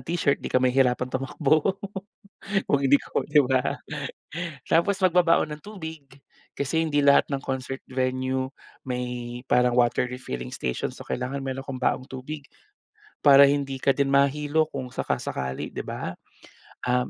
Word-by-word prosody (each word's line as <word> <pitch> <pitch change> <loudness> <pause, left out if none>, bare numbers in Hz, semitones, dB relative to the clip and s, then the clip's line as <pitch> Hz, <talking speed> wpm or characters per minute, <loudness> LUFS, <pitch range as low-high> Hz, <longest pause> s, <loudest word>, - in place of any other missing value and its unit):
t-shirt 165 -4 0
'di - - -4
ka - - +1
mahihirapang 125 0 +2
tumakbo, 150 +6 +1 0.9
kung 140 - +3
hindi 140 +1 +5
ko - - -2
'di 150 0 +4
ba. 130 +1 +1 0.9
Tapos 190 +4 +2
magbabaon 170 -4 +3
ng 150 - -9
tubig, 160 -7 -7 0.6
kasi 140 +4 0
hindi 145 -3 +1
lahat 140 - +5
ng 140 -2 -2
concert 130 0 -3
venue 130 0 -1 0.4
may 125 -1 -4
parang 125 -1 +3
water 120 0 +3
refilling 65 - -5
station, 60 -1 -2
so - - -11
kailangan 135 +2 -3
meron 135 0 -3
kang 135 -2 -5
baong 130 +1 0
tubig, 135 +4 -6 0.8
para 140 -1 +9
hindi 135 -2 -1
ka - - +2
din 140 -1 +2
mahilo 150 +3 +2
kung 130 -2 -6
saka-sakali 65 - -3
'di - - -3
ba. - - -4 0.7
Ah, 125 0 +1
135 Hz, 145 wpm, -25 LUFS, 125-145 Hz, 0.9 s, para